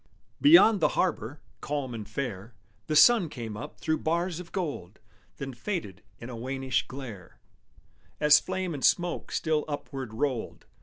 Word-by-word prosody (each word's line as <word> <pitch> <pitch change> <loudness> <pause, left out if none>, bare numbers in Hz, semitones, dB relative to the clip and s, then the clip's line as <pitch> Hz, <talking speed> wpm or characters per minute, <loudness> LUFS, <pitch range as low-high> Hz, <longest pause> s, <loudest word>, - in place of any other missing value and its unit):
Beyond 285 - +7
the - - +4
harbor, 145 - -1 0.2
calm 140 -4 -3
and 110 -2 -7
fair, 110 -3 -5 0.3
The 155 - -1
sun 200 +1 +6
came 115 -6 -6
up 105 - -8
through 160 0 0
bars 170 +1 -1
of 175 -2 -10
gold, 140 - -4 0.4
Then 135 -1 -5
faded 120 - -5 0.2
in 115 - -9
a 125 - -7
wannish 130 +1 -2
glare, 120 -9 -9 0.8
As 150 0 +7
flame 185 -2 -3
and 140 - -6
smoke 175 -1 +1
still 155 -2 0
upward 135 -5 -6
rolled. 130 -2 -3
140 Hz, 150 wpm, -28 LUFS, 120-170 Hz, 0.8 s, Beyond